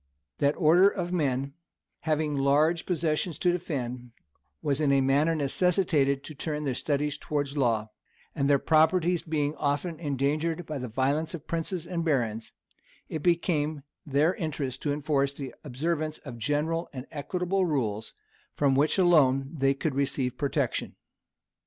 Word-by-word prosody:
That 145 0 +2
order 175 +4 +6
of 180 -3 -4
men, 140 -4 0 0.5
having 155 -2 0
large 150 +5 +2
possessions 165 -1 0
to 180 - +2
defend, 125 -8 -4 0.5
was 145 0 0
in 145 -2 +3
a 140 - +4
manner 140 +5 +3
necessitated 150 -2 +1
to 155 - -8
turn 150 +1 -3
their 135 -3 -1
studies 145 +2 -1
towards 145 -2 -2
the 145 - -3
law; 110 -4 +1 0.4
and 140 0 0
their 140 - +6
properties 165 +4 +3
being 155 -3 -1
often 150 +3 -1
endangered 155 +3 -1
by 150 -2 -4
the 125 - -4
violence 140 +8 0
of 165 - -8
the - - -38
princes 165 +1 -2
and 170 -2 -3
barons, 115 -8 -1 0.6
it 160 - -4
became 155 -3 +1 0.2
their 150 +3 +2
interest 150 - -4
to 145 - -1
enforce 140 -1 0
the 140 -2 -7
observance 155 +3 -2
of 125 -5 -9
general 150 +7 -1
and 130 -2 -7
equitable 180 +5 -1
rules, 110 -8 -2 0.4
from 140 -2 +2
which 145 +7 +2
alone 140 -7 +4
they 135 -3 +2
could 145 +1 -2
receive 135 -2 0
protection. 140 +1 -1
150 Hz, 150 wpm, -28 LUFS, 135-165 Hz, 0.6 s, order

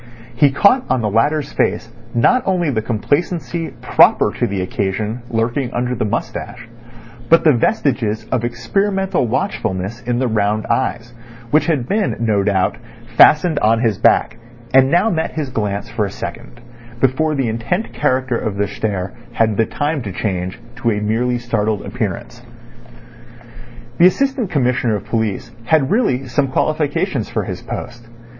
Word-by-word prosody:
He 140 +4 +5
caught 200 - +4
on 130 -2 +1
the 105 -2 -1
latter's 140 +6 +1
face - - 0 0.3
not 250 - +4
only 175 -5 +1
the 110 -4 0
complacency 160 - -1 0.2
proper - - +4
to - - -1
the 100 -2 -2
occasion 105 +5 -2
lurking 120 +3 -1
under 125 +1 -1
the 115 - -1
moustache, 115 +2 -4 0.6
but 165 - +6
the 155 - +6
vestiges 120 - 0
of 125 -3 0
experimental 195 +7 0
watchfulness 110 - -2
in 120 0 -2
the 130 +1 +1
round 105 -1 0
eyes, 120 -2 -1 0.4
which 155 +5 +3
had 140 -8 0
been, 205 +3 0
no 110 -3 +1
doubt, 95 -2 +1 0.4
fastened 155 +1 +6
on 115 +2 +2
his 110 -5 0
back, 115 - +3 0.4
and 135 0 +6
now 175 +8 +3
met 160 -3 -2
his 150 -4 -3
glance 105 -1 -2
for 110 -3 0
a - - -4
second 120 - -8 0.4
before 140 +5 +1
the 135 -3 0
intent 115 - -2
character 130 -1 0
of 110 -3 -3
their 100 0 0
stare 95 -2 -3 0.2
had 110 -2 +1
the 115 +2 +1
time 145 0 -2
to 105 -4 -5
change 90 -2 -3 0.2
to 120 -2 0
a 105 -2 0
merely 115 +4 0
startled 110 -3 -1
appearance. 120 0 -4 1.6
The 175 - +8
Assistant 265 +1 0
Commissioner 125 -5 +1
of 100 - -5
Police 110 -1 -2
had 140 +1 +2
really 165 - +1
some 130 +3 0
qualifications 150 +2 -1
for - - -2
his - - -6
post. 120 -1 -7
120 Hz, 155 wpm, -18 LUFS, 110-150 Hz, 1.6 s, The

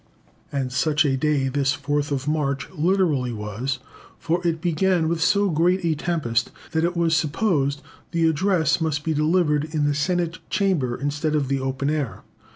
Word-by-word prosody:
And 135 -3 -2
such 150 +4 +2
a 135 -2 +2
day 140 0 +1
this 135 0 0
4th 145 0 -1
of 140 0 -2
March 140 -3 -1
literally 165 -7 +1
was, 110 +5 -3 0.4
for 165 +2 -1
it 165 -1 0
began 175 0 +1
with 165 0 -1
so 200 +2 +3
great 175 +3 +2
a 165 - +2
tempest 145 -8 -1 0.2
that 160 0 0
it 170 +1 0
was 165 -1 +2
supposed 150 -3 0 0.3
the 165 -1 +1
address 160 -1 +2
must 150 -2 -1
be 160 - 0
delivered 155 -1 +2
in 155 -1 -1
the 145 - +2
Senate 170 +3 -1
Chamber 180 -12 +1
instead 145 +3 -1
of 140 -3 0
the 135 0 +1
open 135 +2 -1
air. 145 -6 -3
155 Hz, 170 wpm, -23 LUFS, 140-170 Hz, 0.4 s, so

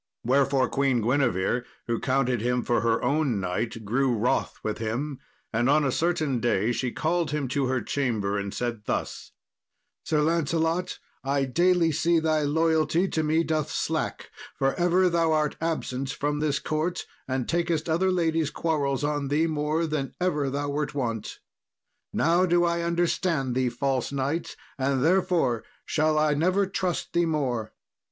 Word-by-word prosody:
Wherefore 135 +1 +3
Queen 135 -3 +1
Guinevere, 120 -3 +1 0.2
who 115 -1 -1
counted 130 -3 +1
him 125 +1 0
for 120 - +1
her 115 -1 +1
own 140 -4 +1
knight, 110 +4 -3
grew 125 +2 +1
wroth 115 +4 0
with 110 -1 -3
him, 125 +6 -3 0.3
and 120 +3 +2
on 150 +1 +4
a 135 - +1
certain 155 -5 0
day 115 -1 +1
she 120 +1 -1
called 165 +3 0
him 150 -1 -1
to 135 0 0
her 130 -1 -1
chamber, 110 -8 -1
and 100 0 -4
said 115 -2 -4
thus: - - -3 0.7
"Sir 150 -1 +1
Lancelot, 165 +2 0 0.3
I 135 0 +1
daily 170 +4 +3
see 170 +3 +2
thy 160 -1 +2
loyalty 160 +3 +2
to 160 - 0
me 155 +2 +2
doth 155 -2 -1
slack, 160 0 -2 0.3
for 135 0 +1
ever 180 +1 +3
thou 165 -2 +2
art 150 -1 +1
absent 135 -5 -2
from 145 +2 -2
this 150 -2 +1
court, 155 +3 -2 0.2
and 130 -2 -2
takest 170 -2 0
other 175 +4 +2
ladies' 165 -3 +1
quarrels 145 -3 -1
on 145 -1 -1
thee 150 +4 +2
more 155 +1 0
than 150 -4 -3
ever 150 -6 0
thou 145 +1 -2
wert 145 0 -2
wont. 115 -6 -3 0.7
Now 175 +3 +3
do 175 0 +3
I 170 0 0
understand 170 -5 0
thee, 130 0 +1
false 130 +1 -1
knight, 140 +4 -2 0.2
and 135 0 +1
therefore 165 -9 +2 0.2
shall 155 0 +1
I 155 -1 +3
never 185 +7 +2
trust 185 -2 -2
thee 170 -1 +2
more. 130 -8 -1
145 Hz, 160 wpm, -26 LUFS, 130-165 Hz, 0.7 s, on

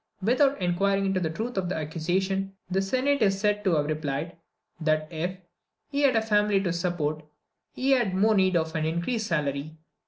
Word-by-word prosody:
Without 270 +5 +3
inquiring 195 +2 +1
into 190 -1 +1
the 165 -3 -1
truth 220 +8 -4
of 185 -2 -1
the - - -2
accusation, 185 +5 -1 0.2
the 190 +1 +2
Senate 260 +7 +1
is 195 -2 +3
said 210 0 +1
to 185 -5 +2
have 150 -1 +1
replied, 150 +1 -3 0.4
that 155 -1 +1
if 175 +3 -3 0.5
"he 285 0 0
had 275 -4 +4
a 225 - +3
family 210 -2 +3
to 175 -3 0
support, 170 -3 -1 0.5
he 265 +2 +1
had 240 -8 +3
the - - -1
more 215 +3 +4
need 190 -2 +3
of 160 -1 -1
an 160 - 0
increased 170 +8 -1
salary." 150 -1 -2
190 Hz, 190 wpm, -27 LUFS, 160-210 Hz, 0.5 s, had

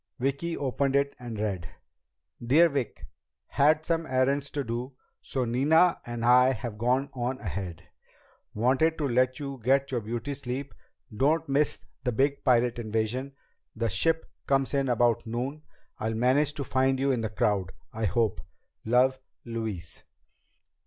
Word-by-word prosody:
Vicki 140 +6 -1
opened 140 0 0
it 140 0 +2
and 120 -3 -6
read: 100 -5 -2 0.7
"Dear 155 +8 +5
Vic: 140 -6 -3 0.4
Had 155 +2 +3
some 165 -1 0
errands 135 +2 +1
to 145 0 -3
do, 125 +2 -4 0.3
so 130 -2 -2
Nina 155 +9 +3
and 120 -1 -3
I 125 +2 +6
have 110 -3 -6
gone 130 +4 +1
on 125 +1 -2
ahead. 95 -4 -5 0.7
Wanted 130 +9 +2
to 150 - 0
let 130 +1 +1
you 140 -3 -6
get 135 +3 +2
your 120 -3 -1
beauty 115 +5 -4
sleep. 135 0 -5 0.4
Don't 155 +7 +2
miss 140 +2 0 0.2
the 125 - 0
big 140 +4 +1
pirate 120 -2 +3
invasion. 115 +5 -2 0.4
The 115 0 -1
ship 160 - +1 0.2
comes 135 0 +1
in 135 -2 +1
about 120 -1 +2
noon. 130 +6 -3 0.4
I'll 110 +1 -2
manage 135 +6 +2
to 140 - -3
find 130 0 +1
you 135 +1 +2
in 125 -3 0
the 110 - -2
crowd 100 -3 0 0.2
I 110 0 -2
hope. 100 -2 +1 0.4
Love, 130 +3 +3 0.3
Louise." 110 -7 -5
130 Hz, 150 wpm, -28 LUFS, 115-140 Hz, 0.7 s, I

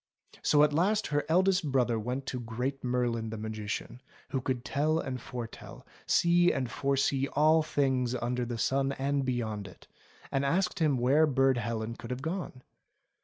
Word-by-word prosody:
So 150 0 +4
at 150 -1 +3
last 200 +7 +2
her 145 - +2
eldest 180 -2 +3
brother 125 -3 +2
went 125 +5 -3
to 125 - -4
Great 125 +4 -4
Merlin 120 -3 -1
the 110 - -5
Magician, 110 +3 -5 0.3
who 135 - -1
could 125 -1 -2
tell 155 +3 +1
and 130 -6 -3
foretell, 120 -3 -8 0.2
see 175 +1 +4
and 130 -3 -2
foresee 135 0 +1
all 155 +2 +5
things 130 -5 0
under 125 +1 -1
the 120 -1 -4
sun 135 +3 +1
and 140 +1 -1
beyond 110 -5 -2
it, 95 - -15 0.4
and 135 - 0
asked 180 +8 0
him 150 -5 +2
where 140 +6 +4
Burd 135 -2 +3
Helen 115 0 -3
could 115 - -10
have 125 +1 -4
gone. 160 -6 -4
130 Hz, 170 wpm, -30 LUFS, 120-145 Hz, 0.4 s, all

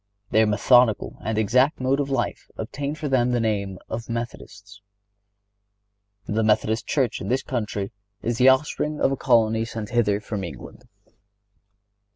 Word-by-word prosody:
Their 110 0 +4
methodical 115 +2 +3
and 110 0 -2
exact 125 +7 +2
mode 130 +2 +1
of 140 -1 -1
life 135 -3 -2
obtained 145 +2 -4
for 155 - -4
them 125 -3 +2
the 120 - +2
name 100 -4 -1
of 115 +1 -6
Methodists. 100 -4 -7 1.4
The 110 +2 0
Methodist 110 +1 +1
Church 130 -6 0
in 95 - -5
this 130 +4 0
country 105 -5 -3 0.3
is 120 +1 -1
the 130 +1 +7
offspring 150 +2 +1
of - - +2
a - - +1
colony 115 -4 +2
sent 110 -2 -6
hither 105 -4 +2
from 105 -2 -5
England. 85 - -9
115 Hz, 150 wpm, -24 LUFS, 105-130 Hz, 1.4 s, the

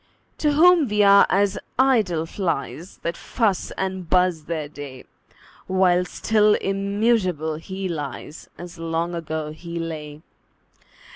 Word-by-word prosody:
To 300 -1 +2
whom 335 0 +5
we 210 -1 +2
are 200 0 +7
as 200 +1 +1 0.2
idle 220 -11 +2
flies, 165 -1 -4
That 170 0 -2
fuss 210 -3 -1
and 190 -3 -3
buzz 180 -4 +2
their 155 -3 -3
day; 140 -3 -10 0.6
While 180 -1 +3
still 210 +2 +2
immutable 195 -5 0
he 190 +4 -5
lies, 150 -2 -6
As 175 0 -10
long 165 +1 -2
ago 160 -2 -4
he 170 +2 -8
lay. 155 -2 -6
180 Hz, 125 wpm, -23 LUFS, 160-200 Hz, 0.6 s, are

